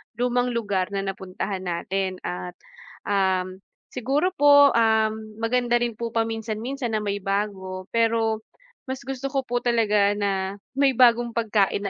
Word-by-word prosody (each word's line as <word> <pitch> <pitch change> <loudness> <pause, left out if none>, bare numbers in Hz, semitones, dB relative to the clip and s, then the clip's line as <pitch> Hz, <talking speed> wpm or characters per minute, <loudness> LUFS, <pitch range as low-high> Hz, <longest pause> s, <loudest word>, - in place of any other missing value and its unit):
lumang 245 +1 0
lugar 200 -5 0
na 195 - -1
napuntahan 190 0 -4
natin 185 +1 -2
at 180 0 -5 0.5
um, 190 -2 0 0.3
siguro 275 +9 0
po, 285 -4 +6
um, 220 -1 +3 0.3
maganda 240 +1 +1
rin 240 0 +1
po 235 - -2
paminsan-minsan 225 +2 -2
na 215 - -1
may 205 -1 -2
bago, 195 -1 -3
pero, 225 -1 +1 0.5
mas 260 -1 -5
gusto 270 0 -6
ko 270 - +1
po 245 -2 -2
talaga 210 -4 +3
na 200 -1 -2 0.2
may 275 -1 +4
bagong 240 -1 +4
pagkain 205 -3 +1
220 Hz, 135 wpm, -24 LUFS, 195-240 Hz, 0.5 s, po